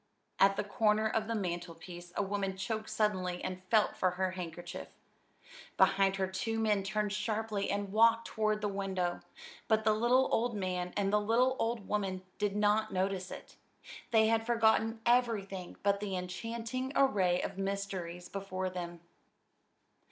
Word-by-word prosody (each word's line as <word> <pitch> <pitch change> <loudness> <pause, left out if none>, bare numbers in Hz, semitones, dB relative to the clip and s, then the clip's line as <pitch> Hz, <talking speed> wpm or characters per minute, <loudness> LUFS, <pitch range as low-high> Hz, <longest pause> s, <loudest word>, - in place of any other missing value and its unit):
At 195 0 +6
the - - -1
corner 215 +1 +2
of 220 0 -1
the 230 - -1
mantelpiece 175 -2 -5
a - - +1
woman 195 -1 -2
choked 215 +3 -3
suddenly 185 -4 0
and 185 0 -4
felt 215 -2 +3
for 185 - +2
her 190 0 +1
handkerchief. 175 0 -6 0.9
Behind 195 0 +4
her 195 -1 0
two 225 +4 -2
men 210 -2 +2
turned 210 +1 -1
sharply 215 -1 -1
and 200 -1 -2
walked 230 +2 +5
toward 215 -1 0
the 210 - 0
window; 190 -3 -2 0.5
but 220 0 +3
the 215 0 +4
little 245 +4 +3
old 235 0 +1
man 180 -2 -2
and 200 0 +1
the 210 - +4
little 245 +5 +3
old 225 -3 -1
woman 190 -3 -1 0.2
did 205 -1 0
not 210 +1 +2
notice 190 0 -1
it. - - -10 0.5
They 220 -1 +5
had 225 0 +2
forgotten 225 -1 +2
everything 215 -7 +1
but 200 0 +2
the 200 -2 -3
enchanting 230 +8 -4
array 190 -10 +3
of 195 - -4
mysteries 195 -3 -3
before 190 -1 -4
them. 175 -2 -6
200 Hz, 155 wpm, -32 LUFS, 185-220 Hz, 0.9 s, At